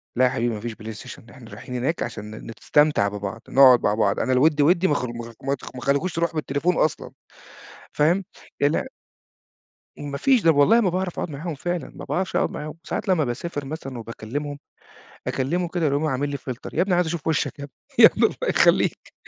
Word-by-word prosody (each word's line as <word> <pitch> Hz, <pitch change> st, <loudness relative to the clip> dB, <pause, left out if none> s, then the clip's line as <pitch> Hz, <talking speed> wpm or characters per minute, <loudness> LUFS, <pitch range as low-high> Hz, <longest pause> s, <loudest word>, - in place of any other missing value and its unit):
"لأ 130 Hz, +1 st, +4 dB
يا -, -, +4 dB
حبيبي 120 Hz, -2 st, -1 dB
ما -, -, -6 dB
فيش 115 Hz, +2 st, -5 dB
بلايستيشن، 110 Hz, +1 st, -10 dB
إحنا 120 Hz, -2 st, -13 dB
رايحين 125 Hz, -, -8 dB
هناك 135 Hz, +7 st, -1 dB
عشان 105 Hz, 0 st, -6 dB
ن 115 Hz, -, -9 dB
نستمتع 150 Hz, -9 st, +3 dB
ببعض، 105 Hz, +2 st, -5 dB
نقعد 130 Hz, -3 st, +7 dB
مع 105 Hz, -, +2 dB
بعض، 105 Hz, -2 st, +1 dB
أنا 130 Hz, -, +1 dB
الوِد 145 Hz, +3 st, +3 dB
وِدّي 170 Hz, +5 st, +4 dB
ما 150 Hz, -, +2 dB
خ 125 Hz, -, -1 dB
ما 120 Hz, -1 st, -6 dB
خ 115 Hz, 0 st, -10 dB
ما 135 Hz, +1 st, 0 dB
ت 130 Hz, -, -12 dB
ما 125 Hz, -, -7 dB
خلّيكوش 140 Hz, +8 st, 0 dB
تروحوا 165 Hz, 0 st, -1 dB
بالتليفون 155 Hz, +4 st, 0 dB
أصلًا." 155 Hz, -, 0 dB, 0.8 s
فاهم؟ 170 Hz, +6 st, +2 dB, 0.4 s
الع 145 Hz, +3 st, +2 dB, 1.1 s
ما 140 Hz, -1 st, -5 dB
فيش، 260 Hz, -, +3 dB
طب 165 Hz, -1 st, +5 dB
والله 220 Hz, +12 st, +5 dB
ما 195 Hz, -5 st, +2 dB
باعرف 185 Hz, 0 st, -3 dB
أقعد -, -, -3 dB
معاهم 155 Hz, +3 st, -5 dB
فعلًا، 175 Hz, +4 st, -4 dB
ما -, -, -8 dB
باعرفش 185 Hz, 0 st, -2 dB
أقعد -, -, +1 dB
معاهم. 150 Hz, +1 st, -6 dB
ساعات -, -, -4 dB
لمّا 180 Hz, -5 st, +3 dB
باسافر 145 Hz, +4 st, -4 dB
مثلًا 135 Hz, -3 st, -6 dB
وباكلّمهم، 125 Hz, +6 st, -6 dB, 0.7 s
أكلّمه 170 Hz, +7 st, -1 dB
كده 170 Hz, -1 st, -1 dB
يقوم 145 Hz, +2 st, 0 dB
عامِل 145 Hz, 0 st, -1 dB
لي 140 Hz, -, -3 dB
فلتر، 130 Hz, -2 st, -7 dB
يا 170 Hz, -, +1 dB
ابني 190 Hz, 0 st, +1 dB
عايز 180 Hz, -, +2 dB
أشوف 165 Hz, -1 st, -4 dB
وِشَّك 160 Hz, -2 st, -1 dB
يا -, -, -6 dB
ابني، 140 Hz, -, -19 dB, 0.3 s
يا -, -, +11 dB
ابني -, -, +1 dB
الله -, -, -1 dB
يخلّيك -, -, +2 dB
145 Hz, 210 wpm, -23 LUFS, 125-165 Hz, 1.1 s, يا